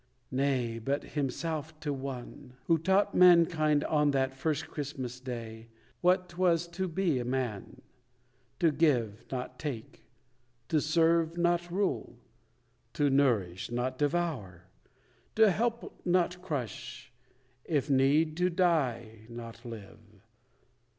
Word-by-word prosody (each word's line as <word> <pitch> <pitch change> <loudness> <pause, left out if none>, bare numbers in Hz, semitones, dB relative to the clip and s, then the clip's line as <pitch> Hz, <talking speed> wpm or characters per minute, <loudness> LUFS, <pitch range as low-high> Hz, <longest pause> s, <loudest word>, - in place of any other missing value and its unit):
Nay, 130 -4 0
but 135 +5 -1
Himself 155 +2 -3
to 145 -2 -2
one; 130 -1 -7
Who 165 -1 +3
taught 190 +5 +2
mankind 165 -4 +5
on 150 -1 +2
that 135 -1 +1
first 155 +3 -1
Christmas 135 -5 -5
Day, 115 -3 -7 0.3
What 180 +1 +3
'twas 175 -1 +1
to 185 +2 -3
be 170 -5 0
a - - -2
man; 120 -5 -4 0.8
to 165 -2 +4
give, 120 -9 +1
not 125 -1 -5
take; 120 -8 -6 0.7
To 155 -2 +2
serve, 165 +1 +2
not 175 0 +1
rule; 195 +2 -2 0.8
to 145 -1 +2
nourish, 110 -10 +1
not 125 +2 -2
devour; 145 - -1 0.7
To 220 -2 +6
help, 235 +4 -2
not 180 0 +1
crush; 135 - -5 0.5
if 145 -3 0
need, 145 +4 +3
to 180 +1 +2
die, 130 - 0
not 115 0 -9
live. 115 -5 -9
145 Hz, 115 wpm, -30 LUFS, 125-170 Hz, 0.8 s, To